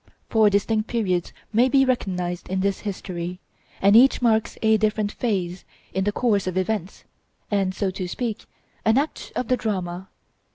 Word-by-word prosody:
Four 220 -2 +5
distinct 215 +2 +1
periods 190 -7 -1 0.2
may 240 +4 +4
be 270 0 +4
recognized 180 -8 -2
in 190 0 0
this 195 0 0
history; 180 -3 -5 0.4
and 200 +2 +6
each 260 +4 +7
marks 220 -3 +1
a 220 0 +5
different 215 -1 0
phase 190 -7 -2 0.3
in 190 0 0
the 205 - +2
course 205 -4 +1
of 185 0 -2
events, 190 -1 -2 0.5
and, 195 -2 +1
so 195 -2 -1
to 185 -1 -4
speak, 225 +3 -4 0.4
an 220 +2 +3
act 295 +3 -2
of 250 - -2
the 255 - +2
drama. 185 -4 -3
205 Hz, 165 wpm, -24 LUFS, 185-225 Hz, 0.5 s, each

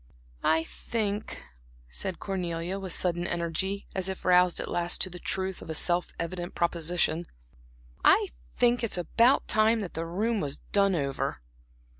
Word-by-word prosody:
"I 160 +1 +3
think," 210 +3 -3 0.5
said 180 - -4
Cornelia, 180 -1 -3
with 190 -2 -5
sudden 175 0 0
energy, 170 +4 -2
as 190 0 -1
if 190 - -6
roused 180 -1 +5
at - - -3
last 175 0 +1
to 185 - +1
the 180 - -8
truth 190 0 -2
of - - -10
a 160 - -2
self 175 +2 +2
evident 175 +1 -4
proposition, 170 0 0 0.8
"I - - +5 0.3
think 240 0 +3
it 230 - -1
is - - +2
about 235 - +3
time 220 +1 +3
that 190 - -5
the 165 +1 -3
room 215 +6 0
was 145 -4 -2
done 200 -2 +4
over." 140 - -2
180 Hz, 160 wpm, -28 LUFS, 170-195 Hz, 0.8 s, roused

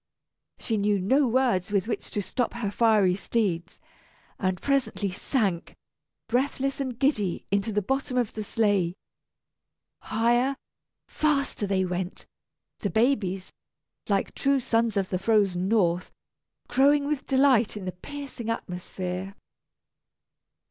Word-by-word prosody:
She 225 - -2
knew 205 0 +2
no 260 +9 +3
words 235 -7 +1
with 200 0 +1
which 235 - -3
to 205 - -2
stop 245 +5 -2
her 230 -4 -3
fiery 210 -5 +4
steeds, 185 -4 -2 0.6
and 185 -2 0
presently 265 -8 0
sank, 190 -3 -1 0.5
breathless 270 +2 0
and 260 -4 -3
giddy, 220 - 0
into 200 +2 +1
the 210 -1 0
bottom 270 +3 -1
of 240 -4 0
the 215 - -4
sleigh. 200 -5 +1 1.0
Higher, 240 +5 +1 0.5
faster 280 -8 0
they 190 -1 +1
went; 180 0 -4 0.5
the 200 - -1
babies, 210 -6 0 0.6
like 200 -1 +1
true 275 0 +2
sons 230 -3 +1
of 195 -2 0
the 185 - -1
frozen 195 -4 +2
North, 180 -5 +1 0.6
crowing 280 +3 +4
with 290 -1 -2
delight 260 -6 +3
in 195 - -6
the 185 - -2
piercing 265 +3 -7
atmosphere. 185 -2 -4
215 Hz, 125 wpm, -26 LUFS, 190-260 Hz, 1.0 s, fiery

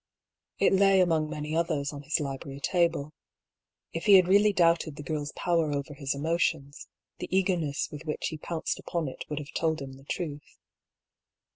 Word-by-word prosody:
It - - +3
lay 195 0 +5
among 160 -4 +2
many 150 0 -4
others 155 -4 0
on 140 - -7
his 150 +3 0
library 140 -1 -5
table. 160 -2 0 0.8
If 165 - -4
he 200 - +9
had 185 -2 +6
really 205 +3 +5
doubted 170 -5 +2
the 145 - -8
girl's 145 0 -3
power 165 -3 +1
over 140 0 -3
his 140 -1 -3
emotions, 155 -2 -1 0.3
the - - -5
eagerness 180 -6 0
with 150 0 -8
which 150 - -2
he 155 - -7
pounced 165 0 -3
upon 170 -3 -3
it 130 - -6
would 150 - -3
have 150 0 -6
told 160 -1 +1
him 135 -1 -7
the 135 - -17
truth. 150 -2 -5
155 Hz, 175 wpm, -28 LUFS, 145-170 Hz, 0.8 s, he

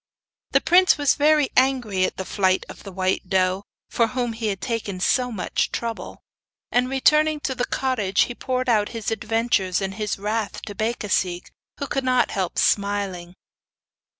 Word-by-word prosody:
The - - +5
prince 365 0 +5
was 285 -2 +3
very 300 -1 +3
angry 245 -8 +2
at - - -4
the 190 - -4
flight 190 -2 +1
of - - -11
the 195 - -9
white 185 0 -1
doe, 190 +1 +1 0.2
for 230 - +1
whom 245 -1 -2
he 225 0 -3
had 195 -2 -2
taken 220 -6 -3
so 250 +6 +1
much 205 -5 -1
trouble, 230 -1 -5 0.5
and 245 +1 +2
returning 305 +3 +3
to 265 - -2
the 245 -1 -1
cottage 220 -8 0
he 245 - +1
poured 255 +1 -2
out 215 -4 +2
his 225 - -3
adventures 220 -4 0
and 195 -1 -3
his 210 0 -3
wrath 210 +1 -3
to 205 - -7
Becasigue, 200 -5 -1 0.3
who 280 - -3
could 270 0 -2
not 255 -1 +2
help 190 -3 -2
smiling. 200 -3 0
220 Hz, 170 wpm, -23 LUFS, 195-255 Hz, 0.5 s, The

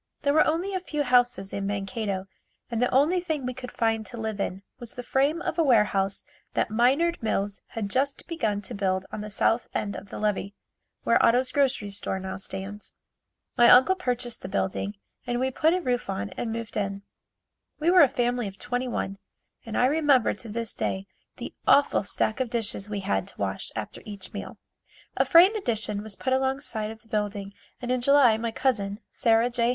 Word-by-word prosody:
There 285 -1 +3
were 310 - +5
only 345 +5 0
a 375 - 0
few 300 -5 -2
houses 245 -6 +2
in 200 0 -2
Mankato 200 -1 -3 0.5
and 230 0 -1
the 250 - +3
only 300 +8 +4
thing 315 -6 -3
we 250 - -2
could 250 0 -8
find 225 -1 0
to 240 - -8
live 220 -2 -3
in 195 0 -3 0.2
was 240 -2 -5
the 245 - -6
frame 280 +7 +1
of 320 - -2
a - - +5
warehouse 210 -7 +2 0.3
that - - 0
Minard 275 +10 +2
Mills 205 -2 -1 0.2
had 215 -3 -1
just 270 +6 -1
begun 215 -12 -2
to 240 - -6
build 190 -2 0
on - - -5
the 210 - -6
south 225 +3 +1
end 200 -1 -2
of 200 - -9
the - - -7
levee, 205 -1 -1 0.5
where - - +3
Otto's 250 +2 +3
grocery 265 -7 +1
store 195 -1 -2
now 190 0 -5
stands. 195 +2 -7 0.6
My 240 0 +6
uncle 260 +9 +7
purchased 245 -9 -2
the - - -6
building 195 +2 -2 0.3
and 240 0 0
we 260 +1 0
put 320 +6 +3
a 365 - -1
roof 250 -5 -1
on 100 +1 -3
and 230 - -4
moved 230 -1 -5
in. 200 -1 -2 0.8
We 325 +3 +3
were 365 -1 +7
a 285 - +7
family 245 -2 0
of 195 0 -9
twenty 245 +5 -2
one 195 -5 -3 0.5
and 220 - -3
I 245 - +4
remember 285 -3 +3
to 225 +2 -8
this 230 +1 -3
day 190 0 -2 0.3
the - - -7
awful 285 -6 +5
stack 215 +3 -1
of 255 -2 -1
dishes 225 -3 -1
we 205 -2 -3
had 95 - -1
to - - -10
wash 95 -1 -3
after 110 -2 -5
each 200 -3 -8
meal. 205 - -7 0.6
A - - +2
frame 355 +5 +7
addition 215 - -1
was 215 -1 -7
put 260 - -1
along 265 +1 +1
side 215 -6 -3
of 220 0 -10
the - - -25
building 205 -2 -3 0.3
and 245 0 -3
in 255 -1 +1
July 275 -3 +6
my 230 +1 -2
cousin, 210 -4 -1
Sarah 230 +1 +3
J. 235 -1 +1
230 Hz, 205 wpm, -26 LUFS, 205-260 Hz, 0.8 s, uncle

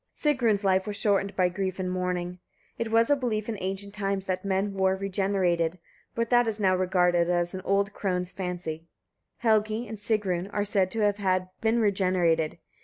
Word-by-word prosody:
Sigrun's 240 -9 +1
life 190 0 +2
was 205 - -3
shortened 200 -1 +1
by 185 -1 +3
grief 185 +1 -3
and 185 -1 -2
mourning. 180 -1 -2 0.4
It 230 -1 -1
was 230 +3 +3
a - - +6
belief 225 -6 -2
in 230 - -2
ancient 195 +2 -3
times 195 -2 -2
that 185 -1 -2
men 195 +1 0
were 190 -1 +2
regenerated, 190 -3 0 0.4
but 230 +1 -1
that 240 -1 +5
is 220 -1 -2
now 190 -2 +3
regarded 180 -2 +2
as 175 0 0
an 190 - -5
old 200 +1 +1
crone's 180 -3 -2
fancy. 175 -3 -5 0.6
Helgi 220 +1 +2
and 215 0 -7
Sigrun 200 -4 -1
are 205 0 -1
said 195 -2 +1
to 225 +3 -2
have 195 -3 +1
been 225 +1 +2
regenerated. 185 -7 +1
195 Hz, 180 wpm, -27 LUFS, 180-210 Hz, 0.6 s, a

